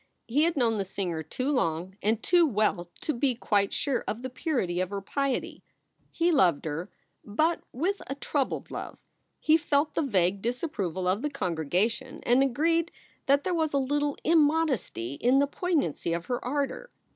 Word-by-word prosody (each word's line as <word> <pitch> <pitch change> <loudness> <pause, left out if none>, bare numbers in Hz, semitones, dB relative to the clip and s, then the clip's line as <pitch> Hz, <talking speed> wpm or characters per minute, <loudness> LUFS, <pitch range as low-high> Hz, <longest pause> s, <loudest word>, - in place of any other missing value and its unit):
He 285 +7 +3
had 340 -2 0
known 230 -4 +2
the 200 - 0
singer 180 -4 -3
too 255 - -2
long 180 - -1
and 220 +2 +1
too 350 -2 +5
well 205 - 0
to 305 - -1
be 250 +1 +1
quite 205 -4 +1
sure 280 -4 -1
of 230 +4 -3
the 260 - -4
purity 255 - -1
of 185 - -1
her 200 0 -3
piety. 275 +6 -2 0.5
He 340 +1 +1
loved 180 - +3
her, 160 +3 -3 0.3
but 310 +11 +1
with 365 +10 -1
a 275 - -3
troubled 280 -1 -2
love. - - -6 0.4
He 315 0 +5
felt 300 -1 +1
the - - +1
vague 195 - +1
disapproval 205 - -2
of 190 +4 +1
the 295 - -1
congregation 205 - -1
and 245 +2 +4
agieed 330 +6 +2 0.4
that 280 +1 +4
there 370 - -1
was 320 -3 0
a - - +3
little 290 +2 0
im 330 +1 +5
modesty 275 - 0
in 250 +3 +4
the 280 - +5
poignancy 285 - -1
of 170 +1 -3
her 245 +3 -2
ardor. 280 - -2
255 Hz, 180 wpm, -28 LUFS, 195-295 Hz, 0.5 s, too